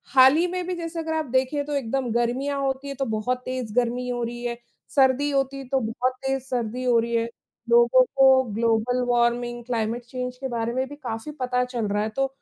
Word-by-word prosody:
हाल 265 +2 +8
ही 335 - +3
में 360 0 -3
भी, 365 - -2
जैसे 335 -1 -5
अगर 320 0 -2
आप 315 -1 -1
देखें, 265 +3 +1
तो 295 - -4
एकदम 265 -1 -1
गर्मियाँ 255 +4 0
होती 270 +1 -2
है, 275 - -5
तो 270 0 -2
बहुत 220 +3 -1
तेज 255 -4 -4
गर्मी 245 0 0
हो 245 -1 -2
रही 240 +1 -5
है। 235 0 -2 0.3
सर्दी 270 +1 +3
होती 275 0 -1
तो 270 0 +2
बहुत 245 +3 -1
तेज 270 0 0
सर्दी 250 -1 -3
हो 245 -2 +3
रही 235 +1 -1
है, 230 0 +2 0.4
लोगों 240 +2 +6
को 265 -1 +6
ग्लोबल 230 +2 +1
वार्मिंग, 240 0 +1
क्लाइमेट 235 0 -2
चेंज 250 0 -5
के 265 - -4
बारे 235 0 -2
में 260 +1 -1
भी 290 - -8
काफ़ी 255 0 -5
पता 250 -1 +1
चल 240 -4 -3
रहा 205 +1 0
है 215 - -2
तो, 270 - +2
250 Hz, 215 wpm, -24 LUFS, 235-270 Hz, 0.4 s, हाल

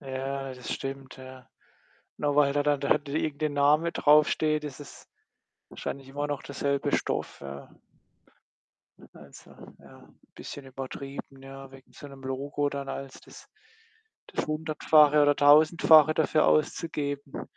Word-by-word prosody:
Ja, 135 0 -5
das 125 -2 -6
stimmt, 135 -1 -7
ja. 130 -1 -13 0.7
Nur 145 -1 0
weil 145 -1 +4
da 145 0 +1
dann 145 -1 +1
da 140 - -3 0.2
irgend 155 -1 -2
'n 150 - 0
Name 150 +4 +3
draufsteht, 150 0 +3
ist 145 -1 -8
es 145 - -13 0.6
wahrscheinlich 135 -1 -7
immer 145 +2 -3
noch 145 -2 -4
derselbe 140 0 -1
Stoff, - - -3
ja. 70 0 -9 1.5
Also, - - -15 0.3
ja, - - -18 0.2
bisschen 140 -1 -9
übertrieben, 135 +1 -8
ja, 135 0 -11
wegen 135 -1 -17
so 145 - -12
'nem 135 -1 -13
Logo 140 +2 -2
dann 140 -1 -6
als 135 -1 -7
das - - -15 0.8
das - - -4
Hundertfache 155 -1 +3
oder 145 0 +4
Tausendfache 155 +1 +6
dafür 155 -1 +2
auszugeben. 145 -2 -1
140 Hz, 135 wpm, -27 LUFS, 135-150 Hz, 1.5 s, Tausendfache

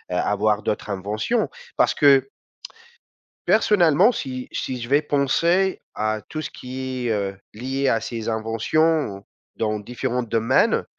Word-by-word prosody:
avoir 105 +3 +1
d'autres 105 - -2
inventions. 105 - -1 0.3
Parce - - +3
que 135 -2 +5 1.2
personnellement 190 -3 +4
si 130 - -5
si 125 -2 -3
je 120 - -6
vais 145 +3 +3
penser 170 +7 +1
à 110 0 -1
tout 155 - -4
ce - - -4
qui 130 -1 -5
est, - - +2
heu, 100 -2 -2 0.2
lié 135 +4 -2
à 115 - +2
ces 115 0 -4
inventions 115 +2 0 0.3
dans 110 -1 -1
différents 125 +3 -3
domaines, 115 +2 +2
125 Hz, 130 wpm, -23 LUFS, 110-145 Hz, 1.2 s, que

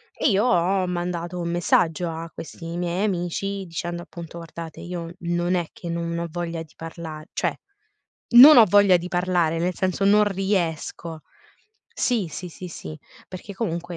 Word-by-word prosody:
e 290 - +2
io 205 +3 +3
ho 185 -3 +2
mandato 175 0 -3
un 170 0 -2
messaggio 170 0 +1
a 165 +1 -6
questi 165 +1 -8
miei 175 +3 -1
amici 195 +1 -2
dicendo, 175 +1 -4
appunto: 170 -1 -10
"Guardate, 165 -1 -8
io 175 -1 -6
non 175 +1 -1
è 175 -3 0
che 170 - -8
non 170 0 -2
ho 170 0 -2
voglia 170 -1 -4
di 155 - -20
parla 160 -1 -8
cioè - - -1 0.7
non 265 +5 +10
ho 230 - +10
voglia 200 -1 +6
di 175 +1 -5
parlare, 175 -2 +1
nel 180 +1 0
senso, 185 +1 -1
non 210 +1 +6
riesco". 175 -4 -2 0.8
Sì, 230 -7 +1
sì, 180 +4 -7
sì, 180 +2 -9
sì, 155 -1 -8 0.3
perché 190 +2 -9
comunque, 175 -5 -3
175 Hz, 165 wpm, -24 LUFS, 170-185 Hz, 0.8 s, non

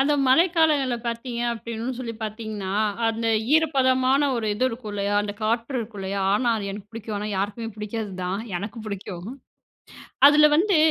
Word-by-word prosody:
அந்த 285 +2 +3
மழைக்காலங்கள்ல 305 -3 +3
பார்த்தீங்க 235 +1 -3
அப்படின்னு 230 +2 -5
சொல்லி 235 -3 -4
பார்த்தீங்கன்னா, 215 -3 -5 0.4
அந்த 225 0 -2 0.3
ஈரப்பதமான 265 -3 +3
ஒரு 225 -2 -2
இது 250 +5 0
இருக்கும் 230 -3 -7
இல்லையா 205 0 -1
அந்த 205 0 -4
காற்று 230 +4 -1
இருக்கும் 215 -2 -7
இல்லையா 195 +1 -3
ஆனா 240 +3 +1
அது 200 -2 -4
எனக்கு 205 +1 -8
புடிக்கும். 220 -2 -6
ஆனா 210 - -4
யாருக்குமே 205 +4 -2
புடிக்காதுதான், 205 -3 -4 0.2
எனக்கு 205 +6 -6
பிடிக்கும். 190 -3 -6 1.0
அதுல 300 +1 +7
வந்து 390 +2 +3
230 Hz, 150 wpm, -24 LUFS, 205-255 Hz, 1.0 s, அதுல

